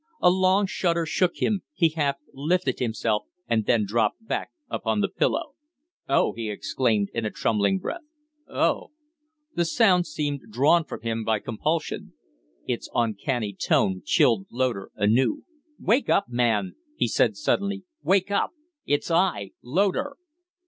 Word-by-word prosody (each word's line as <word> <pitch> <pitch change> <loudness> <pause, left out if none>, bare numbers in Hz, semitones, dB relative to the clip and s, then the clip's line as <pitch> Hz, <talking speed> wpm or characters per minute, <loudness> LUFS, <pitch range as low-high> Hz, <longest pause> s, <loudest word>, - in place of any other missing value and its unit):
A 180 - +5
long 185 +2 +3
shudder 170 -3 0
shook 175 +2 +1
him; 205 -4 0
he 165 - +4
half 145 -3 0 0.2
lifted 150 -1 0
himself 110 -3 0 0.2
and 110 -2 0
then 110 -3 +3
dropped 110 - 0
back - - -2 0.2
upon - - -1
the - - +2
pillow. - - -1 0.6
"Oh!" 135 - +3
he 115 -2 -4
exclaimed, 105 -1 0
in 115 - -2
a 105 - 0
trembling 100 -3 +1
breath. 345 - -5 0.5
"Oh!" - - +1 0.7
The 170 - +1
sound 180 0 +3
seemed 145 -2 -2
drawn 150 +9 +3
from - - -7
him 115 0 -2
by 110 0 +1
compulsion. 150 +10 -3 0.5
Its - - -3
uncanny 110 -1 0
tone 95 0 +1
chilled 105 -6 +3
Loder 120 -6 -1
anew. 120 - +2 0.4
"Wake 245 +6 +2
up, 200 - +3
man!" 120 - +1 0.2
he - - +1
said, - - +2
suddenly. 200 -8 0 0.2
"Wake 190 +5 +2
up! 200 - +1 0.3
It's 145 +4 0
I 165 - +1
Loder." 200 - 0
135 Hz, 140 wpm, -25 LUFS, 110-180 Hz, 0.7 s, A